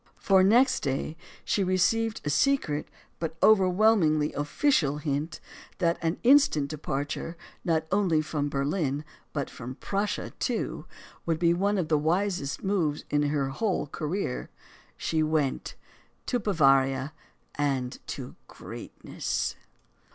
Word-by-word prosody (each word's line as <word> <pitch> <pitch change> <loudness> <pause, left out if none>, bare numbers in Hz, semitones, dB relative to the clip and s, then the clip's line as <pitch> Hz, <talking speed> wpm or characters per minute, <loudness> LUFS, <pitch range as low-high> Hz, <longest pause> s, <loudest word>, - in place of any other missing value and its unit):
For, 190 -1 +4
next 245 +7 +5
day, 140 +2 -2 0.3
she 200 - +1
received 215 +5 +1
a - - 0
secret, 155 - +1 0.3
but 165 -1 -4
overwhelmingly 185 -6 +4
official 150 - +1
hint 150 +1 -3 0.4
that 170 -2 +1
an 165 +1 0
instant 245 - +5
departure 150 +2 -4 0.3
not 160 -2 +1
only 190 -5 +3
from 145 -1 -2
Berlin, 140 +1 -1 0.3
but 140 -3 -2
from 125 +2 -8
Prussia, 200 +6 -2
too, - - -2 0.4
would 165 -1 +1
be 170 0 +3
one 200 +4 +1
of 175 -4 0
the 155 -2 +2
wisest 170 -2 -1
moves 175 -7 0
in 145 - +3
her 140 -2 0
whole 185 +5 -1
career. 150 -1 -3 0.5
She 160 -1 0
went. 155 -3 0 0.5
To 245 - 0
Bavaria, 135 - +3 0.4
and 135 -4 -1
to - - -6
greatness. - - -5
160 Hz, 120 wpm, -27 LUFS, 145-195 Hz, 0.5 s, next